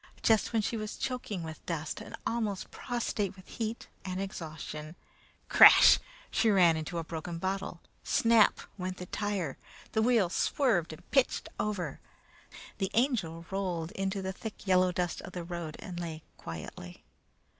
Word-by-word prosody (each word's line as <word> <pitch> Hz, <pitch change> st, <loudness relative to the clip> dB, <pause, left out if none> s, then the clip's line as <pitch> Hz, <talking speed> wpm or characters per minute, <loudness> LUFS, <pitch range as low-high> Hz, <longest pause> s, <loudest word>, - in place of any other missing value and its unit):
Just 220 Hz, -2 st, +4 dB
when 225 Hz, -2 st, +1 dB
she 230 Hz, -, -1 dB
was 215 Hz, 0 st, -5 dB
choking 250 Hz, -8 st, -3 dB
with 160 Hz, -1 st, -8 dB
dust, 155 Hz, -3 st, -3 dB
and -, -, -8 dB
almost 215 Hz, -5 st, -2 dB
prostrate 215 Hz, -5 st, -2 dB
with 185 Hz, -1 st, -15 dB
heat 225 Hz, 0 st, -4 dB, 0.2 s
and 185 Hz, -1 st, -3 dB
exhaustion 160 Hz, -4 st, -6 dB, 0.5 s
crash, -, -, +9 dB, 0.3 s
she 225 Hz, -, +3 dB
ran 180 Hz, -5 st, +6 dB
into 160 Hz, +2 st, -4 dB
a 165 Hz, -, -1 dB
broken 165 Hz, +1 st, -5 dB
bottle. 190 Hz, -1 st, -3 dB, 0.2 s
Snap! 230 Hz, -5 st, +4 dB, 0.2 s
went 185 Hz, 0 st, -3 dB
the 180 Hz, -, -6 dB
tire; 195 Hz, -7 st, -2 dB, 0.3 s
the 220 Hz, -, +2 dB
wheel 225 Hz, -4 st, +4 dB
swerved 205 Hz, -, +2 dB
and 155 Hz, -, -12 dB
pitched 270 Hz, -3 st, +2 dB
over. 185 Hz, -8 st, -2 dB, 0.8 s
The 195 Hz, -, 0 dB
Angel 200 Hz, -, +1 dB
rolled 180 Hz, -4 st, -2 dB
into 195 Hz, -2 st, -2 dB
the 190 Hz, 0 st, -2 dB
thick 215 Hz, +2 st, -8 dB
yellow 185 Hz, -1 st, +4 dB
dust 175 Hz, -1 st, -2 dB
of 185 Hz, -, -9 dB
the 175 Hz, -, -4 dB
road 170 Hz, -2 st, -5 dB
and 180 Hz, -4 st, -7 dB
lay 160 Hz, -2 st, -5 dB
quietly. 85 Hz, +2 st, -8 dB
185 Hz, 155 wpm, -31 LUFS, 165-215 Hz, 0.8 s, crash